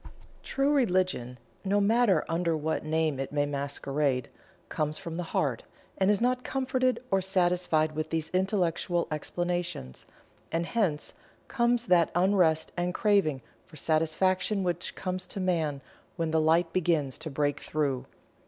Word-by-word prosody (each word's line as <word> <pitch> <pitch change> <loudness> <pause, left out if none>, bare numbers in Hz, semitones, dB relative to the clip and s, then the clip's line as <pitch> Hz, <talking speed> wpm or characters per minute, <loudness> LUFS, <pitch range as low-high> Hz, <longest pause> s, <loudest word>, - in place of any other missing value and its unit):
True 275 +1 +1
religion, 185 - +1 0.3
no 200 +1 +2
matter 205 -4 +3
under 165 -1 0
what 155 +1 -2
name 155 -2 0
it 135 - -3
may 145 0 +1
masquerade, 140 -2 -1 0.4
comes 155 0 -2
from 165 -1 -6
the - - -1
"heart" 130 -6 0 0.3
and 190 0 +2
is 205 -1 +3
not 250 +1 +1
comforted 255 -1 0
or 195 0 +3
satisfied 175 -4 +2
with 155 +1 -3
these 160 -1 -2
Intellectual 180 -2 0
explanations, 175 - -3 0.4
and 165 +1 0
hence 175 -9 -1 0.3
comes 240 0 +1
that 175 -5 +4
unrest 175 -4 +3
and 175 0 -1
craving 195 - +2 0.2
for 170 - -15
satisfaction 185 +6 +1
which 175 -1 -2
comes 185 0 -4
to - - -6
Man 160 -7 0 0.3
when 165 -2 -1
the 160 0 +3
light 165 +2 +3
begins 160 -7 0
to 160 0 -5
break 145 0 0
through. 140 -4 -2
170 Hz, 145 wpm, -28 LUFS, 155-190 Hz, 0.4 s, that